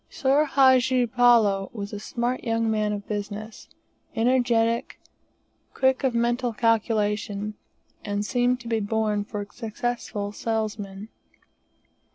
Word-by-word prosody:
Boor 280 +3 +4
Hadji 260 -2 +4
Palloo 230 -5 +3
was 205 -2 -6
a 205 - -4
smart 240 +4 -2
young 225 -1 0
man 215 -1 0
of 205 -1 -5
business, 210 +1 -6 0.5
energetic, 235 -1 +1 0.8
quick 265 0 +2
at 260 -3 +1
mental 240 +1 0
calculation, 210 -2 0 0.5
and 205 0 -2
seemed 245 +2 +1
to 235 - -10
be 225 -1 0
born 210 0 0
for 205 0 -5
a 205 - -16
successful 225 -3 -4
salesman. 215 -2 -4
225 Hz, 120 wpm, -25 LUFS, 210-245 Hz, 0.8 s, Boor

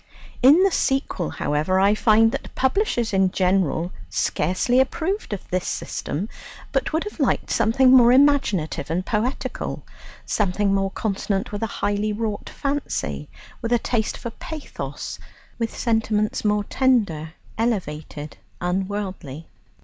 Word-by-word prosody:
In 290 +9 +7
the 390 - +4
sequel, 270 - 0
however, 155 +6 0
I 200 +2 +5
find 225 +1 +4
that - - -6
publishers 265 - +1
in 190 -1 +4
general 180 -2 +1 0.2
scarcely 185 +10 +1
approved 335 - 0
of 205 - -5
this 180 0 -1
system, 180 +8 -3 0.4
but - - 0
would 320 +2 0
have 420 -4 -8
liked 275 - +1
something 235 +3 +4
more 240 -2 +7
imaginative 250 - +3
and 180 +3 -1
poetical 235 +5 -2 0.4
something 200 0 +1
more 195 0 +1
consonant 195 +1 -2
with 205 0 -4
a 225 - 0
highly 205 0 -1
wrought 210 -1 -3
fancy, 285 0 -3 0.3
with 230 -1 -3
a 240 - +5
taste 225 -1 -1
for 235 - -6
pathos, 310 +5 -7 0.4
with 230 -1 -2
sentiments 220 -2 0
more 210 -1 +2
tender, 200 - +1 0.3
elevated, 155 -9 -3 0.2
unworldly. 185 -5 -3
210 Hz, 130 wpm, -23 LUFS, 185-245 Hz, 0.4 s, In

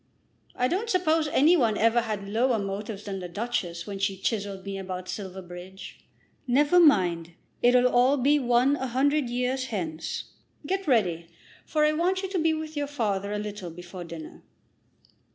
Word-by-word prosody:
I 250 - +1
don't 400 - -2
suppose 325 -6 +2
any 300 +4 +4
one 230 -9 +2
ever 230 +2 +3
had 210 -3 -4
lower 235 +4 +1
motives 200 +1 -4
than 195 -2 -5
the 180 -1 -6
Duchess 175 -4 -3
when 200 -2 -6
she 195 0 0
chiselled 200 -1 -3
me 195 -1 -4
about 185 -1 -6
Silverbridge. 185 -1 -8 0.5
Never 290 +7 +4
mind; 175 - +3 0.3
it'll 245 +1 +5
all 250 +3 +4
be 285 +3 +3
one 250 +2 +3
a 265 - -3
hundred 275 +2 +1
years 250 +2 -1
hence. 170 -9 -4 0.3
Get 385 +3 -2
ready, 180 - +1 0.4
for 305 -1 +2
I 305 - +4
want 360 +5 0
you 385 - -3
to 375 -2 -1
be 325 0 +3
with 315 0 -4
your 290 -1 -1
father 205 -8 -2
a 210 - -1
little 205 -3 -5
before 175 +2 -9
dinner." 165 -2 -9
230 Hz, 170 wpm, -27 LUFS, 190-285 Hz, 0.5 s, it'll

